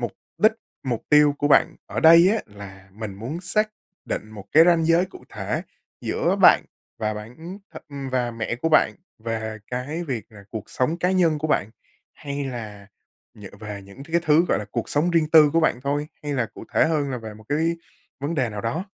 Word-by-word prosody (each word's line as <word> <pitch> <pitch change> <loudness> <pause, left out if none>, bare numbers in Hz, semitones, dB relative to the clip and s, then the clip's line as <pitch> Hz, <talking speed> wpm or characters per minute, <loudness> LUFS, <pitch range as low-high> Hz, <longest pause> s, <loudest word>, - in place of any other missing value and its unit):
mục - - -3 0.3
đích, 215 +1 +5 0.3
mục 125 -4 -2
tiêu 150 -1 +5
của 145 - +1
bạn 160 +3 +4
ở - - -3
đây 170 +3 +8
á, 225 - 0
là 100 -2 -12
mình 105 -1 -6
muốn 125 - -6
xác 215 +4 0 0.3
định 110 - -4
một 105 -3 -10
cái 160 +2 +8
ranh 170 -2 +4
giới 165 +2 +4
cụ - - -14
thể - - -3 0.4
giữa - - 0
bạn - - +7 0.3
và 110 0 -1
bạn 105 +3 -9
ừm, 175 +5 -9 0.2
th - - -9
ừm, 140 -2 -6
và 125 -2 0
mẹ 115 0 -3
của 165 +6 -1
bạn 155 - +4 0.2
về 110 -1 -4
cái 145 +8 -4
việc 120 - -3
là 100 -2 -13
cuộc 110 -3 -7
sống 155 +7 0
cá 180 +2 +1
nhân 170 -5 +2
của 155 - -2
bạn? 105 -7 +1 0.4
Hay 140 -1 -5
là 110 -6 -7 0.5
nhờ 105 -2 -10
về 105 -2 -7
những 100 +7 -12
cái 165 +2 0
thứ, 155 +3 +5
gọi - - +2
là, 105 - -5
cuộc - - -3
sống 155 +4 +1
riêng 160 -2 +2
tư 155 -2 +8
của 165 - +3
bạn 125 -6 +1
thôi? 145 +2 -2
Hay 145 - -3
là 120 -4 0
cụ - - -9
thể - - +5
hơn 145 -4 0
là 125 - -3
về 110 -2 -8
một 110 - -15
cái 145 - +1 0.6
vấn 145 +4 -2
đề 130 -6 +1
nào 105 -1 -5
đó? 120 - -2
140 Hz, 220 wpm, -23 LUFS, 110-160 Hz, 0.6 s, đây